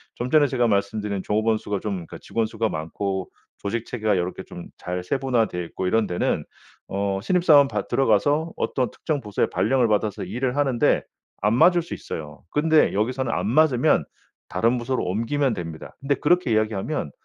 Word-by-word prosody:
좀 120 +1 -3
전에 150 -2 +5
제가 125 -3 +1
말씀드린 100 0 -1
종업원 110 +3 +1
수가 100 -2 -3
좀 105 - -2
그러니까 85 -3 -8
직원 115 -1 -1
수가 110 0 -2
많고 95 +4 -3 0.3
조직체계가 110 -1 -1
요렇게 90 +1 -3
좀 85 - -10
잘 90 0 -4
세분화 125 +1 +1
되어 90 -1 -4
있고 85 +2 -5
이런 110 +3 +2
데는 90 -1 -1 0.4
어 100 0 -1
신입사원 150 - +5
받 105 -5 -3
들어가서 145 +7 +2
어떤 130 -2 -1
특정 155 -2 -3
부서에 105 -3 0
발령을 130 -3 +2
받아서 105 -1 0
일을 125 +1 -2
하는데 135 -5 +2 0.4
안 105 +2 +2
맞을 175 +5 +5
수 170 - -8
있어요. 75 -1 -7
근데 155 +1 +3
여기서는 120 +4 0
안 - - -1
맞으면 130 0 +3 0.4
다른 115 +2 +1
부서로 125 +2 -1
옮기면 115 +7 0
됩니다. 85 -5 -7
근데 140 +1 0
그렇게 175 -3 +2
이야기하면 110 - -1
115 Hz, 390 characters per minute, -24 LUFS, 100-135 Hz, 0.4 s, 전에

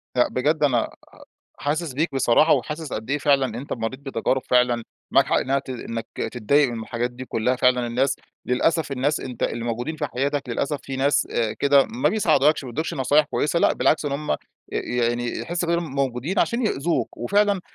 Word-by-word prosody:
لأ، 125 - +4
بجد 150 +4 0
أنا 135 -4 +3
آآ - - -14 0.6
حاسس 155 +1 -2
بيك 150 +3 -1
بصراحة، 135 +4 +4
وحاسس 150 -2 -2
قد 110 +4 -5
إيه 145 - +1
فعلًا 135 -5 +2
أنت 140 - -6
مريت 115 +2 -3
بتجارب 130 -1 -1
فعلًا، 125 -1 +3 0.3
معاك - - +4
حق - - +2
إنها 135 +1 +1
ت 135 - -11
إنك 115 -2 -5 0.3
تتضايق 130 +4 +3
من 115 -1 -5
الحاجات 120 +2 -2
دي 125 +1 -8
كُلّها، 125 +2 0
فعلاً 125 -1 +3
الناس 130 +4 +1 0.3
للأسف 155 +4 +1
الناس 140 +3 0
أنت 125 -2 -7
اللي 120 - -1
موجودين 120 +7 -3
في 150 - -2
حياتك 140 +1 -2
للأسف 140 +5 -1
في 135 -1 -5
ناس 140 +2 +2
آآ 115 -2 0
كده 140 -1 +4
ما 230 +3 0
بيساعدوكش 155 -8 +3
ما 125 - -6
بيدوكش 155 +7 -3
نصايح 145 +3 +3
كويسة 150 +3 0
لأ، - - +4
بالعكس 155 - +2
إن 145 - -1
هُم 140 - -1 0.3
يعني 120 0 -1
ي 120 - -3
يحس 175 +1 -2
بإنهم 170 -4 -1
موجودين 140 - -1
عشان 235 0 +1
يأذوك، 165 -2 -1
وفعلًا 200 - +2
135 Hz, 195 wpm, -23 LUFS, 125-150 Hz, 0.6 s, لأ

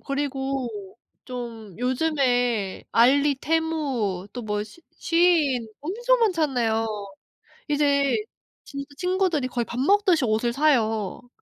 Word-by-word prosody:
그리고 275 -2 -2 0.6
좀 230 -5 -7
요즘에 245 -6 0
알리, 280 +5 +4
테무 280 - -1
또 245 - -6
뭐 210 -1 -2
시 225 +11 -16 0.2
쉬인 320 -9 +2
엄청 480 - +1
많잖아요. 265 - +1 0.8
이제 285 -2 +2 0.5
진짜 280 -1 -7
친구들이 360 -7 0
거의 240 -2 -2
밥 245 +2 -5
먹듯이 370 -2 +3
옷을 225 +2 +1
사요. 235 -6 +1
270 Hz, 210 characters per minute, -24 LUFS, 235-315 Hz, 0.8 s, 알리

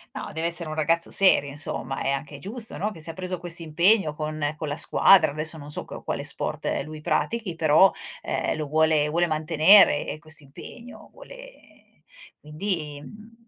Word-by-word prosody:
No, - - -6
deve 160 +1 -2
essere 170 -1 -2
un 155 - -5
ragazzo 165 +2 0
serio, 185 -7 +4
insomma, 140 -2 -4
è - - -1
anche 140 +1 -4
giusto, 225 - -5
no, 210 - -2
che 205 - -11
se 160 +1 -5
ha - - -14
preso 185 +1 -5
questo 170 -1 -3
impegno 170 +3 +2
con 155 -1 -3
con 155 - -5
la 145 - -3
squadra, 170 +1 +5
adesso 155 +2 -3
non 145 0 -10
so 150 - -4
qua - - -9
quale - - -4
sport - - -2 0.2
lui 155 +1 -9
pratichi, 215 +5 -2
però, 160 +4 +5 0.3
ehm, - - -2
lo 155 - -3
vuole 155 0 +2
vuole 170 +3 +1
mantenere 155 +1 +5
eh, - - -5
questo 155 -1 -4
impegno, 235 - -13
vuole - - -16 0.4
quindi, 150 -2 -4
mhmm 225 +5 -15
160 Hz, 185 wpm, -24 LUFS, 150-185 Hz, 0.4 s, squadra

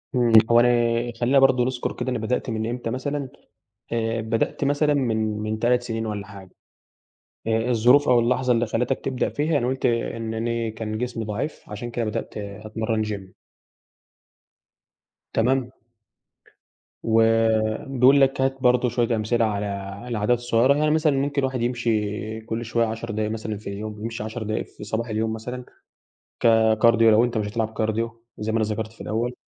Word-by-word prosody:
إمم، 120 -2 +2 0.2
هو 120 - +7
أنا 120 - +5 0.5
خلّينا 135 +3 +4
برضه 130 -2 +4
نذكر 125 -1 -2
كده - - -4
أنا 120 - -1
بدأت 125 +3 -2
من 110 0 -2
إمتى 120 -1 -4
مثلًا 140 +2 -3 0.6
آآ، 115 0 -1
بدأت 115 +5 -1
مثلًا 145 +1 +2
من 120 -6 +1 0.2
من 110 +1 -3
3 120 +1 +2
سنين 115 -2 -3
والّا 105 -2 -4
حاجة 100 -2 -12 1.0
آآ، 115 +2 +1
الظروف 125 +5 +4
أو 125 -1 +5
اللحظة 125 +1 +1
اللي 120 0 +1
خلتك 125 +4 -1
تبدأ 130 -2 -1
فيها 150 0 0
أنا 120 - -1
قُلت 130 0 -1
إن 115 -1 -1
أنا 115 0 -1
كان 110 0 -5
جسمي 120 -2 -3
ضعيف 110 +8 -4
عشان 120 +3 -6
كده 115 0 -2
بدأت 110 +1 -4
أتمرّن 110 +2 -3
gym. 100 -3 -6 2.0
تمام. 125 +2 +1 1.3
وبيقول 115 +4 +3
لك 135 0 +3
هات 135 0 +1
برضه 125 0 +3
شويّة 120 -1 0
أمثلة 115 +2 +1
على 105 -1 -1 0.4
العادات 115 +1 +1
الصغيّرة، 120 +2 +3
يعني 150 +1 +2
مثلًا 155 -3 +2
ممكن 140 +1 0
الواحد 130 -2 -1
يمشي 110 -2 -1
كل 115 +1 -4
شويّة 115 +1 +1
10 115 +1 -5
دقايق 110 0 -2
مثلًا 110 -1 -4
في 105 - -8
اليوم 105 +1 -6
يمشي 115 -2 -4
10 110 +1 -5
دقايق 110 +1 -2
في - - -13
صباح 110 +3 -3
اليوم 110 0 -1
مثلًا 125 +3 -6 0.7
ككارديو 115 0 +4
لو 110 +2 +5
أنت 120 -2 -1
مش 105 -1 -1
هتلعب 110 +1 -2
كارديو 115 +1 -2
زي 110 +1 -3
ما 115 - +1
أنا 110 - +1
ذكرت 110 +1 -3
في - - -14
الأوّل. 115 +3 -2
115 Hz, 165 wpm, -24 LUFS, 110-125 Hz, 2.0 s, هو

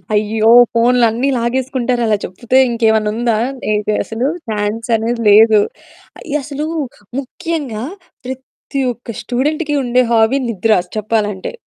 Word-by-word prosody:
అయ్యో! 215 +2 +2 0.2
ఫోన్లన్నీ 240 +2 +2
లాగేసుకుంటారలా 240 -2 0
చెప్పుతే 240 +7 -1
ఇంకేమన్నా 220 -2 +1
ఉందా? 235 -2 0 0.3
ఏ - - +2 0.3
అసలు 230 +4 -2 0.2
ఛాన్స్ 215 +2 -2
అనేది 230 +1 -2
లేదు. 215 +1 +6 0.6
అయ్య! 300 -1 -3
అసలు 295 +1 -4 0.5
ముఖ్యంగా 275 -4 -4 0.4
ప్రత్తి 265 +1 -6
ఒక్క 230 -2 -10
స్టూడెంట్‌కి 295 +4 -1
ఉండే 250 0 +2
హాబీ 225 +4 +3
నిద్ర 215 -1 +2 0.2
చెప్పాలంటే. 210 - -2
235 Hz, 110 wpm, -16 LUFS, 220-260 Hz, 0.6 s, లేదు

